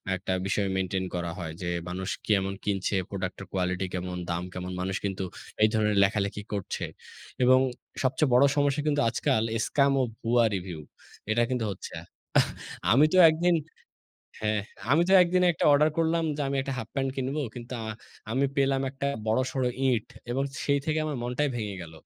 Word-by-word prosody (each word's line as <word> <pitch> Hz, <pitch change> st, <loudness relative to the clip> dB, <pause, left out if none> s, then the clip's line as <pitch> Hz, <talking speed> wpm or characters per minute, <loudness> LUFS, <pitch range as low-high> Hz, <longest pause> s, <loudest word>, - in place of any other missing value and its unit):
একটা 95 Hz, 0 st, -3 dB
বিষয় 100 Hz, +1 st, 0 dB
মেইনটেইন 95 Hz, 0 st, -1 dB
করা 85 Hz, -1 st, -2 dB
হয়। 80 Hz, -2 st, -4 dB
যে 90 Hz, -, -3 dB, 0.2 s
মানুষ 95 Hz, +2 st, -4 dB, 0.2 s
কেমন 95 Hz, -2 st, +2 dB
কিনছে, 100 Hz, -1 st, 0 dB
প্রোডাক্ট 95 Hz, -1 st, -4 dB
এর -, -, -7 dB
কোয়ালিটি 90 Hz, 0 st, 0 dB
কেমন, 90 Hz, 0 st, -3 dB
দাম 85 Hz, +1 st, -2 dB
কেমন 90 Hz, 0 st, -5 dB
মানুষ 95 Hz, +1 st, -2 dB
কিন্তু 95 Hz, -1 st, -2 dB, 0.4 s
এই 110 Hz, -, +8 dB
ধরনের 105 Hz, -1 st, +2 dB
লেখালেখি 100 Hz, 0 st, 0 dB
করছে 100 Hz, -3 st, -3 dB, 0.6 s
এবং 130 Hz, +1 st, +6 dB, 0.4 s
সবচেয়ে 130 Hz, +1 st, +2 dB
বড় 125 Hz, +3 st, +7 dB
সমস্যা 145 Hz, 0 st, +2 dB
কিন্তু 145 Hz, -1 st, +2 dB
আজকাল 110 Hz, -1 st, +1 dB, 0.2 s
স্কাম 140 Hz, -1 st, +3 dB
ও -, -, +3 dB, 0.2 s
ভুয়া 120 Hz, +1 st, +3 dB
রিভিউ। 90 Hz, -3 st, -5 dB, 0.5 s
এটা 120 Hz, -, +3 dB
কিন্তু 125 Hz, -3 st, -1 dB
হচ্ছে। 95 Hz, -, -8 dB, 0.4 s
আহ, -, -, +4 dB, 0.4 s
আমি 135 Hz, +7 st, +6 dB
তো 185 Hz, -, +4 dB
একদিন 175 Hz, +2 st, +2 dB, 0.9 s
হ্যাঁ, 105 Hz, 0 st, +1 dB, 0.3 s
আমি 155 Hz, +4 st, +5 dB
তো -, -, +3 dB
একদিন 180 Hz, +1 st, +2 dB
একটা -, -, -2 dB
অর্ডার 150 Hz, +2 st, +5 dB
করলাম। 165 Hz, 0 st, +2 dB
যে -, -, -5 dB
আমি 140 Hz, -, -1 dB
একটা 135 Hz, +1 st, -3 dB
হাফ 115 Hz, -2 st, -5 dB
প্যান্ট 135 Hz, -1 st, 0 dB
কিনব। 135 Hz, +2 st, -2 dB
আ 115 Hz, -, -12 dB
কিন্তু 120 Hz, +1 st, -8 dB, 0.6 s
আমি 135 Hz, +3 st, +2 dB
পেলাম 135 Hz, -1 st, +2 dB
একটা 140 Hz, +1 st, -4 dB, 0.2 s
বড়সড় 130 Hz, +3 st, +1 dB, 0.2 s
ইট 115 Hz, -4 st, +1 dB, 0.2 s
এবং 135 Hz, +3 st, 0 dB, 0.2 s
সেই 140 Hz, 0 st, +3 dB
থেকে 155 Hz, 0 st, +1 dB
আমার 150 Hz, -2 st, -2 dB
মনটাই 125 Hz, +5 st, 0 dB
ভেঙে 105 Hz, -3 st, -3 dB
গেল। 85 Hz, -1 st, -10 dB
115 Hz, 175 wpm, -27 LUFS, 95-140 Hz, 0.9 s, এই